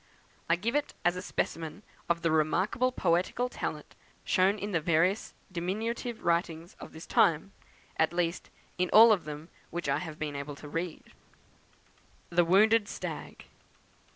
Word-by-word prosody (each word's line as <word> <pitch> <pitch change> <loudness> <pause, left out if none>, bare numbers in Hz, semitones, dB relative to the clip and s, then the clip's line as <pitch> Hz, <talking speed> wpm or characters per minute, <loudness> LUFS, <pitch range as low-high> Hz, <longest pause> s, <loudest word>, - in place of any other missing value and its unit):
I 165 - +5
give 215 +7 -2
it 295 - -1
as 175 0 +3
a 180 - -4
specimen 165 0 -3 0.3
of 170 -1 +1
the 165 - +2
remarkable 180 +11 +1
poetical 185 +4 0
talent - - -5 0.3
shown 190 +2 +3
in 205 +1 -4
the 165 -4 +1
various 170 +6 +1 0.2
diminutive 220 +6 -3
writings 170 0 -1
of - - -10
this 160 - -10
time; 165 +4 +2 0.5
at 160 - +2
least, 170 0 -2 0.3
in 180 - +1
all 225 +1 +8
of 200 -7 +2
them 150 +2 -7 0.2
which 175 +1 -4
I - - +1
have 155 -2 -7
been 150 -2 -4
able 140 +1 -5
to 145 - -11
read. 165 +3 -5 1.2
THE 175 +1 +4
WOUNDED 205 +5 +4
STAG. - - -7
175 Hz, 155 wpm, -29 LUFS, 160-205 Hz, 1.2 s, all